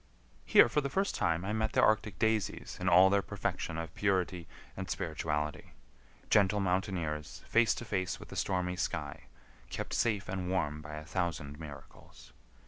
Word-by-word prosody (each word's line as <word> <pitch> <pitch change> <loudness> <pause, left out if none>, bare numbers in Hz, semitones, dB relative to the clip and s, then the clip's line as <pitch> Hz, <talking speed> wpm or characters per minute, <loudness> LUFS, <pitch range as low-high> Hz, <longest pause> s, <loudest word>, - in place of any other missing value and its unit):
Here - - +8
for 150 +6 +1
the 140 - -2
first 195 +7 0
time 85 +1 0
I 105 - -1
met 110 0 0
the - - +4
arctic 105 -3 +2
daisies 110 -1 0
in - - +2
all 95 +2 +7
their 100 0 +4
perfection 80 - -3
of 80 -1 -5
purity 90 -3 0 0.3
and 95 0 -5
spirituality,—gentle 80 - -1
mountaineers 90 -5 -2
face 115 -1 +4
to 120 - -6
face 95 -4 -2
with - - -11
the - - -8
stormy 90 -1 -1
sky, 95 - -3 0.4
kept - - -5
safe 110 -4 +1
and 95 -1 -3
warm 75 -5 -1
by 75 0 -8
a 75 0 -7
thousand 80 -5 -3
miracles. 75 -4 -12
95 Hz, 160 wpm, -32 LUFS, 80-100 Hz, 0.4 s, Here